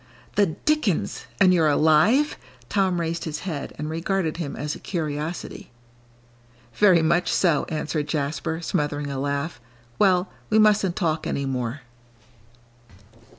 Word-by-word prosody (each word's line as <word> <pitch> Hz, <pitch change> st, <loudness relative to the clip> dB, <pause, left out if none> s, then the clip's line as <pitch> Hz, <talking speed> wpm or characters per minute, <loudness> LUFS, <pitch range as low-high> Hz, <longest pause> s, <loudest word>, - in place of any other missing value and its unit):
"The 205 Hz, -1 st, +3 dB
dickens! 190 Hz, -, -1 dB
And 185 Hz, -1 st, +6 dB
you're 165 Hz, -3 st, +3 dB
alive!" 160 Hz, -, +4 dB, 0.3 s
Tom 190 Hz, -3 st, +1 dB
raised 165 Hz, 0 st, -2 dB
his 155 Hz, -2 st, -4 dB
head 160 Hz, -7 st, -4 dB
and 150 Hz, -, -4 dB
regarded 165 Hz, +1 st, -1 dB
him 160 Hz, -5 st, -4 dB
as 150 Hz, +1 st, -3 dB
a -, -, -8 dB
curiosity. 155 Hz, -1 st, -4 dB, 1.0 s
"Very 185 Hz, -6 st, +5 dB
much 170 Hz, +1 st, +2 dB
so," 170 Hz, -6 st, +2 dB
answered 150 Hz, -1 st, -2 dB
Jasper, 155 Hz, +2 st, -2 dB
smothering 145 Hz, -4 st, -2 dB
a 135 Hz, -, -3 dB
laugh; 140 Hz, 0 st, -3 dB, 0.4 s
"well, 185 Hz, -2 st, +3 dB, 0.2 s
we 215 Hz, -, +3 dB
mustn't 210 Hz, -4 st, +4 dB
talk 160 Hz, -4 st, -1 dB
any 140 Hz, -, -2 dB
more." 130 Hz, 0 st, -3 dB
160 Hz, 130 wpm, -24 LUFS, 150-185 Hz, 1.0 s, And